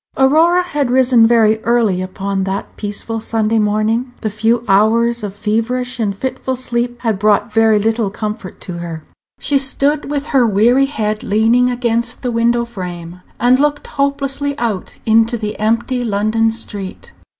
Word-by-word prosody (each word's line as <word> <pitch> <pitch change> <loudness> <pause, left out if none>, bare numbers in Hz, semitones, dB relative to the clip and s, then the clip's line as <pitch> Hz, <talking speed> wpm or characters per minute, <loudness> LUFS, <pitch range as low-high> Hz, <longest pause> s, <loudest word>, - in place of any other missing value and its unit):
Aurora 320 +7 +4
had 295 -7 -2
risen 250 -2 +4
very 220 -2 +3
early 220 -5 +1
upon 195 +1 -3
that 195 +1 -4
peaceful 215 +2 -4
Sunday 220 0 0
morning. 215 +4 0
The 215 - -2
few 225 +3 +1
hours 230 +4 +3
of 205 -2 -6
feverish 245 +4 -2
and 205 -3 -1
fitful 260 +3 -3
sleep 240 -1 -2
had 220 -5 -1
brought 210 +2 +2
very 225 -1 +4
little 220 0 0
comfort 210 -1 -6
to 175 -2 -6
her. 165 -2 -6 0.4
She 280 -1 +1
stood 280 +2 0
with 285 -1 -2
her 260 -5 +3
weary 235 +6 +3
head 215 -6 -2
leaning 225 +4 +2
against 235 -1 -2
the 250 - -1
window 235 +1 +1
frame, 180 -5 -8 0.2
and 245 +3 +4
looked 295 0 0
hopelessly 280 0 -2
out 220 -7 -3
into 225 +2 +3
the 210 -1 -5
empty 230 +4 0
London 220 +1 +1
street. 205 -4 -5
225 Hz, 155 wpm, -16 LUFS, 210-250 Hz, 0.4 s, Aurora